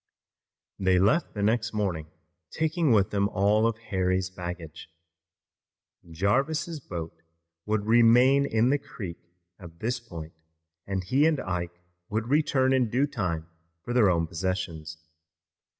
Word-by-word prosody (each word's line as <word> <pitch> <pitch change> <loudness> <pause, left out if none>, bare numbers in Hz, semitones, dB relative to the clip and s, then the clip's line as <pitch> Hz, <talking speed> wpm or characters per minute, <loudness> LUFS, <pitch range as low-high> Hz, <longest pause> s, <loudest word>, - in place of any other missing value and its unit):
They 95 -1 +3
left 105 - +2
the 100 - -2
next 110 +1 +1
morning, 95 -7 -2 0.4
taking 160 -2 0
with 100 -4 +3
them 100 0 +1
all 105 +3 +2
of 115 -1 -1
Harry's 95 -4 -1
baggage. 85 -3 -7 1.2
Jarvis' 140 - 0
boat 85 - -7 0.5
would 105 -1 0
remain 120 +5 +5
in 115 +3 +2
the 145 - +2
creek 95 -10 -8 0.4
at 85 -3 -12
this 120 +2 -1
point, 85 -9 -9 0.5
and 95 -1 -2
he 135 - +3
and 155 -3 +1
Ike 90 -1 -4 0.3
would 110 +2 -2
return 135 -3 +2
in 125 -4 +2
due 130 +6 +2
time 90 - -3 0.4
for 120 - -4
their 115 -5 +5
own 85 -2 +2
possessions. 80 -2 -4
105 Hz, 135 wpm, -27 LUFS, 90-125 Hz, 1.2 s, remain